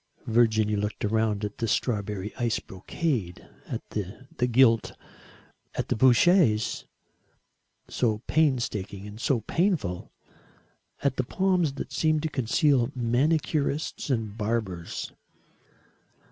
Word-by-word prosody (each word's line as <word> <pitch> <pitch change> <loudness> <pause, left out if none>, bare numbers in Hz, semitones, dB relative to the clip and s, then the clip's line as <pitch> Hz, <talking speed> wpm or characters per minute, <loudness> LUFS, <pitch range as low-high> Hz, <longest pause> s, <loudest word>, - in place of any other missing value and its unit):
Virginia 110 -2 +3
looked 105 +1 -3
round 110 -1 +1
at 105 - -7
the 115 - 0
strawberry 105 -3 -1
ice 120 -3 0
brocade, 95 - -3 0.2
at - - -5
the 110 +5 -4
gilt, 115 -2 +3 0.8
at - - -3
the - - +1
Bouchers 125 - +4 1.0
so 110 -2 -1
painstaking 120 -10 0
and 105 +2 -9
so 125 -4 +1
painful 140 - -1 0.9
at 140 -2 +1
the 130 - +1
palms 180 0 +1
that - - -6
seemed 155 -1 +1
to 160 - -1
conceal 130 0 +2
manicurists 145 +5 0
and 110 -5 -1
barbers. 105 -6 -3
115 Hz, 105 wpm, -27 LUFS, 105-140 Hz, 1.0 s, Bouchers